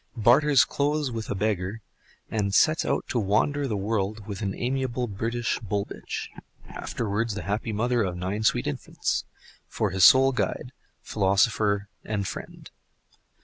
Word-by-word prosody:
barters 125 +3 +5
clothes 145 -1 0
with 115 -2 -5
a - - -1
beggar, 100 0 -1 0.5
and 100 -2 0
sets 155 0 +4
out - - -1
to 120 - 0
wander 115 +8 +1
the 110 -5 -2
world 105 0 -2
with 100 -1 -6
an 100 -2 -2
amiable 125 -1 -1
British 115 +3 -2
bull 100 -2 -2
bitch - - -6 0.4
(afterwards 110 0 -3
the 100 - -5
happy 105 +5 -2
mother 120 +3 +1
of 90 -4 -2
nine 95 +4 -3
sweet 110 - +2
infants) - - -2 0.4
for 105 -3 -1
his 95 -1 +1
sole 135 +4 +8
guide, 125 -1 -2 0.3
philosopher 100 +1 +1 0.2
and 100 -3 -2
friend. - - -8
110 Hz, 145 wpm, -26 LUFS, 100-120 Hz, 0.5 s, sole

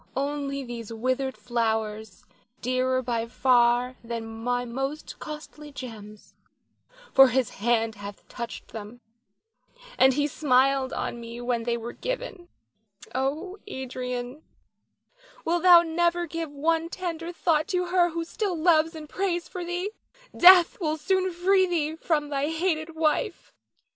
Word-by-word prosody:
Only 280 0 -2
these 235 -3 -7
withered 255 +3 -1
flowers, 220 -3 -2 0.3
dearer 255 +1 0
by 230 -2 -1
far 245 0 +3
than 230 -1 -4
my 245 +2 -2
most 270 +5 -5
costly 300 -1 -9
gems, 215 -6 -10 0.8
for 270 0 +9
his 255 -1 0
hand 225 +1 +1
hath 205 -1 -10
touched 235 -1 -7
them, 220 +2 -9 1.0
and 260 0 +6
he 290 0 +2
smiled 270 -2 +2
on 235 - -3
me 235 +1 -8
when 240 -1 -1
they 235 -1 0
were 235 +1 -6
given. - - -5 0.7
Oh, 310 +10 -2
Adrian, 250 -2 -5 1.0
wilt 345 +1 +1
thou 350 -1 +8
never 345 +1 +1
give 330 -1 -4
one 325 +3 0
tender 340 -2 -4
thought 325 -2 +1
to 360 -3 0
her 355 -1 +3
who 335 0 -3
still 380 0 -2
loves 325 0 +3
and 310 -1 -8
prays 350 0 -2
for 360 - -6
thee? 355 +4 -3 0.4
Death 360 +1 +7
will 310 -2 0
soon 375 +4 +1
free 375 +2 +3
thee 320 -3 -1
from 305 -3 -1
thy 280 0 -1
hated 325 -1 -1
wife. 320 +8 -1
285 Hz, 135 wpm, -26 LUFS, 245-335 Hz, 1.0 s, for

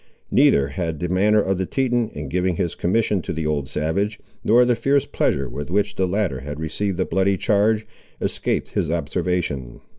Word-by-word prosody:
Neither 70 0 +4
had 80 0 -3
the 90 - -2
manner 105 +4 +3
of 95 -2 -1
the 95 - -1
Teton, 120 -4 0
in 75 -1 -5
giving 90 +4 0
his 85 0 -1
commission 100 +1 +1
to - - -5
the 80 0 -3
old 75 -3 -1
savage, 95 +9 -1 0.2
nor 120 +3 +5
the 120 -1 +3
fierce 135 +4 +2
pleasure 70 - 0
with 70 +3 -6
which 100 +3 0
the 95 -1 +1
latter 90 -8 -1
had 75 +3 -7
received 85 +4 -2
the 95 - +1
bloody 95 0 +1
charge, 105 +2 +2 0.3
escaped - - -1
his 80 - -1
observation. 80 -5 -2
90 Hz, 185 wpm, -22 LUFS, 75-105 Hz, 0.3 s, nor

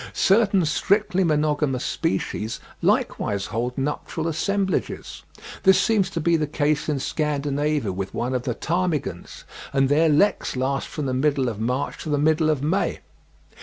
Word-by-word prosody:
Certain 195 -3 +3
strictly 190 +4 +1
monogamous 150 -4 +1
species 115 -9 -2 0.2
likewise 100 -1 0
hold 125 +3 -3
nuptial 150 +3 -3
assemblages; 190 +4 -2 0.4
this 190 -1 +5
seems 200 -1 +2
to 170 - -3
be 170 +1 +2
the 155 -2 0
case 150 0 0
in 150 - 0
Scandinavia 145 -3 -1
with 95 +1 -4
one 125 +2 -2
of 125 - 0
the 120 -2 -3
ptarmigans, 165 - -2 0.3
and 135 -1 +2
their 155 +3 +4
leks 165 +4 +2
last 135 +2 -1
from 150 - -5
the 130 - -1
middle 135 0 +1
of 110 -3 -6
March 125 +5 -2
to - - -6
the 145 - +1
middle 155 +2 +2
of 145 -3 0
May. 185 +7 0
150 Hz, 155 wpm, -23 LUFS, 130-165 Hz, 0.4 s, this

